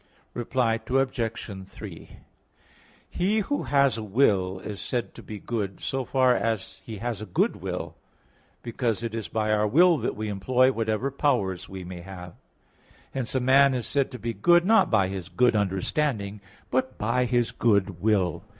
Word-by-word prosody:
Reply 120 Hz, -1 st, 0 dB
Obj. 115 Hz, -7 st, -1 dB
3: -, -, -10 dB, 1.0 s
He 200 Hz, +5 st, 0 dB
who 285 Hz, +8 st, -2 dB
has 140 Hz, -4 st, +3 dB
a -, -, -5 dB
will 100 Hz, -4 st, +2 dB
is 100 Hz, +2 st, -7 dB
said 120 Hz, -2 st, -3 dB
to -, -, -11 dB
be 105 Hz, -, -8 dB
good, 100 Hz, -3 st, -4 dB
so 135 Hz, -1 st, -2 dB
far 130 Hz, -1 st, +3 dB
as 110 Hz, -5 st, -2 dB
he 110 Hz, +1 st, -7 dB
has 115 Hz, +1 st, -4 dB
a 110 Hz, -, -6 dB
good 90 Hz, -, +1 dB
will; -, -, -5 dB, 0.7 s
because 115 Hz, -1 st, -2 dB
it 115 Hz, -1 st, -3 dB
is 115 Hz, -2 st, -4 dB
by 110 Hz, -1 st, -1 dB
our 105 Hz, 0 st, +2 dB
will 170 Hz, -, +5 dB
that 120 Hz, -, -2 dB
we 110 Hz, +1 st, -4 dB
employ 125 Hz, +6 st, +2 dB
whatever 115 Hz, +2 st, -1 dB
powers 100 Hz, -, 0 dB
we 95 Hz, -1 st, -7 dB
may 90 Hz, 0 st, -8 dB
have. 90 Hz, -1 st, -9 dB, 0.8 s
Hence 130 Hz, -1 st, -3 dB
a -, -, +3 dB
man 135 Hz, +1 st, +5 dB
is 125 Hz, -, -2 dB
said 140 Hz, -2 st, 0 dB
to 125 Hz, -, -8 dB
be 115 Hz, 0 st, -3 dB
good, 175 Hz, +6 st, +4 dB
not 220 Hz, -2 st, +5 dB
by 100 Hz, -4 st, +3 dB
his 95 Hz, -2 st, -6 dB
good 120 Hz, +1 st, +3 dB
understanding; 100 Hz, +2 st, -1 dB, 0.3 s
but 130 Hz, +1 st, 0 dB
by 120 Hz, +4 st, +1 dB
his 120 Hz, -1 st, +1 dB
good 100 Hz, -6 st, +1 dB
will. 95 Hz, -4 st, +1 dB
115 Hz, 170 wpm, -26 LUFS, 100-130 Hz, 1.0 s, will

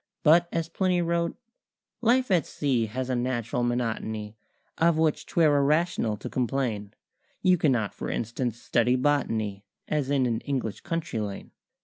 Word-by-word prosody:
But, 170 Hz, +2 st, +5 dB
as 165 Hz, -1 st, -1 dB
Plinny 185 Hz, +1 st, +1 dB
wrote 170 Hz, 0 st, 0 dB, 0.6 s
"Life 245 Hz, 0 st, +3 dB
at 175 Hz, -6 st, +3 dB
sea 125 Hz, -6 st, 0 dB
has 125 Hz, +4 st, -3 dB
a 130 Hz, -, 0 dB
natural 120 Hz, -1 st, -1 dB
monotony 110 Hz, -3 st, -2 dB, 0.4 s
Of 165 Hz, -1 st, +4 dB
which 160 Hz, -1 st, +1 dB
'twere 155 Hz, -4 st, +3 dB
irrational 145 Hz, -6 st, +1 dB
to -, -, -7 dB
complain: 115 Hz, -5 st, -2 dB, 0.5 s
You 185 Hz, -2 st, +4 dB
cannot, 120 Hz, -10 st, +1 dB
for -, -, -5 dB
instance, 115 Hz, 0 st, -2 dB
study 120 Hz, +1 st, +2 dB
botany 115 Hz, -7 st, 0 dB, 0.2 s
As 145 Hz, -3 st, -1 dB
in 140 Hz, -2 st, +2 dB
an 115 Hz, -2 st, 0 dB
English 130 Hz, -7 st, -3 dB
country 165 Hz, -8 st, -3 dB
lane. 100 Hz, -2 st, -5 dB
130 Hz, 145 wpm, -27 LUFS, 115-160 Hz, 0.6 s, But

